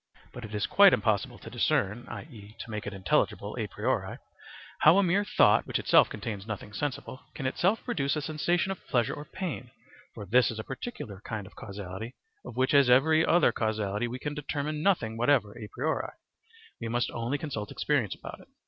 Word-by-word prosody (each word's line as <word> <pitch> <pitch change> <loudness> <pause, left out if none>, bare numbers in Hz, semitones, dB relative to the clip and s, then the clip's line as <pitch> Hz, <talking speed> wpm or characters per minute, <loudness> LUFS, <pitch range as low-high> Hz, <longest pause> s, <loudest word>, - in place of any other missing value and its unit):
But 120 - -8
it 110 -1 -7
is 105 - 0
quite 200 -1 +7
impossible 110 -3 0
to - - -10
discern, 105 +5 0
i.e., 110 -7 -10
to 115 - -8
make 105 -1 -4
it 105 - -4
intelligible 95 -1 0
a - - -1
priori, - - -2 0.6
how 160 +5 +7
a 200 - +5
mere 190 +3 +2
thought, - - +4
which - - 0
itself - - +5
contains 105 -2 -6
nothing 105 -1 -6
sensible, 130 +1 -4 0.2
can 135 - -5
itself 185 +11 +1
produce 140 - 0
a 150 - -2
sensation 175 +5 0
of 195 - -7
pleasure 120 -3 +1
or 145 - -7
pain; 175 - -5 0.5
for 105 - -7
this 125 +6 +4
is 115 - -5
a 110 - -4
particular 115 - -7
kind 110 -3 -5
of 100 - -15
causality 100 +3 -7 0.3
of - - -10
which 130 +2 +2
as 140 -3 +6
of - - +8
every 155 +4 +4
other 175 +1 +4
causality 110 0 -1
we 120 +2 -5
can 145 +3 -4
determine 150 +1 -3
nothing 125 - +1
whatever 120 -4 +2
a 105 - -8
priori; - - -2 0.7
we 115 - -3
must 120 +1 0
only 120 +5 -2
consult 125 -9 -5
experience 130 -10 0
about - - -9
it. - - -17
120 Hz, 195 wpm, -29 LUFS, 105-150 Hz, 0.7 s, of